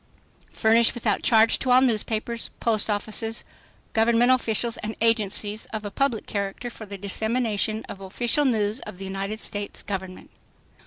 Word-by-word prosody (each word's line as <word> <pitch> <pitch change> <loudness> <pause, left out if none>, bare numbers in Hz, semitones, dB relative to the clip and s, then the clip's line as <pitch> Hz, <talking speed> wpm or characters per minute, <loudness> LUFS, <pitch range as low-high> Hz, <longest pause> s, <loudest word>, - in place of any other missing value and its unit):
"Furnished 225 +1 +3
without 220 -4 0
charge 225 -1 +4
to 260 - -2
all 250 +1 +7
newspapers, 230 -1 0
post 220 -2 +1
offices, 220 +2 0 0.5
government 235 +2 +4
officials 235 -2 +1
and 220 +1 -5
agencies 215 -1 +1
of 215 -1 -6
a 205 - -4
public 265 -4 0
character 200 +4 -4
for 220 -1 -10
the 200 0 -7
dissemination 220 +2 -1
of 195 - -9
official 235 +9 0
news 220 -3 +1
of 180 - -9
the 195 - -7
United 195 +3 -4
States 205 -2 -5
Government." 190 -2 -6
220 Hz, 150 wpm, -25 LUFS, 205-235 Hz, 0.5 s, all